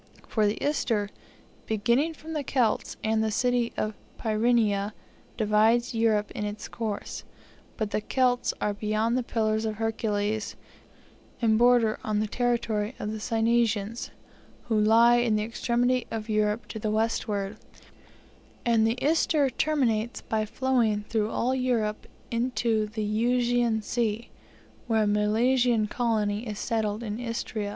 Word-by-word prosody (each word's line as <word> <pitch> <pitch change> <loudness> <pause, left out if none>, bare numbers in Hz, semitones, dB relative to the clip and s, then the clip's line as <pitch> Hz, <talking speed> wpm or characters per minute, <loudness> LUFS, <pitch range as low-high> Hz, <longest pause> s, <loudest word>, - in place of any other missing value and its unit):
For 215 -2 +2
the 205 - -1
Ister, 230 -8 0 0.6
beginning 235 +9 +1
from 320 +1 -9
the 300 -2 -2
Celts, 245 -5 0
and 220 0 +1
the 220 - +1
city 245 +2 +1
of 215 0 -1 0.2
Pyrene, 215 -2 +1 0.4
divides 220 +3 +3
Europe 220 -2 +1
in - - -4
its 210 +1 -5
course; 220 -3 -5 0.5
but 215 -2 -2
the 210 - 0
Celts 250 +2 +1
are 210 - 0
beyond 215 +3 0
the 255 - +1
pillars 220 -2 0
of 220 -1 -2
Hercules, 215 -1 -1 0.8
and 225 -2 +3
border 240 -1 +4
on 215 -1 0
the 215 - +1
territories 230 -1 -1
of 210 - -4
the 220 - -5
Cynesians, 225 -1 0 0.6
who 220 -2 +2
lie 230 +3 +6
in 240 -3 +2
the 210 - 0
extremity 240 +2 0
of 225 0 -5
Europe 215 +1 0
to 220 - -5
the 215 - -2
westward; 215 -2 -1 1.1
and 225 -2 +3
the 230 +2 0
Ister 300 -2 +2
terminates 240 -6 0
by 215 -1 -2
flowing 230 -3 +1
through 220 -1 0
all 250 +3 0
Europe 240 -5 -1 0.2
into 230 -2 0
the 215 0 -4
Euxine 235 +1 +1
Sea, 230 0 -2 0.6
where 220 -2 +2
a - - +1
Milesian 220 +3 +2
colony 220 -1 -1
is 210 -1 -5
settled 220 0 -1
in 215 0 -4
Istria. 230 -3 -3
225 Hz, 140 wpm, -27 LUFS, 215-240 Hz, 1.1 s, lie